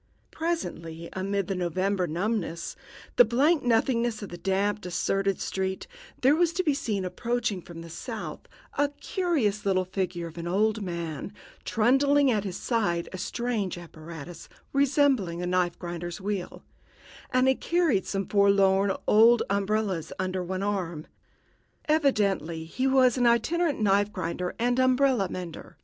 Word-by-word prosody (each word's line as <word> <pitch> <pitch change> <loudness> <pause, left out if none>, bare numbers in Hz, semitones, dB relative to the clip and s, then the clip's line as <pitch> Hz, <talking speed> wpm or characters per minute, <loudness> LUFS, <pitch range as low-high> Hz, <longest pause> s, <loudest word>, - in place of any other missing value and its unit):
Presently, 170 - -4
amid 195 +1 -1
all - - -19
the 185 -2 -2
November 185 +2 0
numbness, 170 0 -2 0.4
the - - +10
blank 275 +8 +3
nothingness 235 -2 +1
of 205 - -6
the 175 - -7
damp, 195 +3 0
deserted 195 +2 -1
street, 190 0 -2 0.4
there 270 +3 +5
was 340 0 +3
to 370 +2 0
be 305 -5 +2
seen 210 -8 -2
approaching 230 0 -2
from 165 -1 -10
the 165 - -10
south 165 - -6 0.3
a 290 0 +3
curious 285 - 0
little 185 -2 +1
figure 185 -2 -3
of 165 +1 -8
an 170 - -5
old 215 +4 +1
man, 170 -2 -4 0.3
trundling 270 +4 +3
at 210 -3 0
his 185 -3 -4
side 190 -8 0
a 185 - -5
strange 230 -6 -2
apparatus 165 -1 -10 0.2
resembling 270 - +2
a - - -1
knife 180 -1 +1
grinder's 175 0 -5
wheel, 195 -2 -4 0.7
and 255 0 +3
he 265 - +6
carried 325 - +1
some 195 -1 -2
forlorn 200 -1 +4
old 230 +2 +6
umbrellas 200 -3 0
under 185 0 -2
one 185 +2 -3
arm. 180 -6 -2 0.8
Evidently 200 - +1
he 255 +11 -1
was 260 -1 +4
an 245 - +4
itinerant 300 +7 +2
knife 205 0 +2
grinder 180 -1 -3
and 245 +2 +1
umbrella 255 -5 +3
mender. 175 -3 -7
200 Hz, 145 wpm, -27 LUFS, 180-245 Hz, 0.8 s, the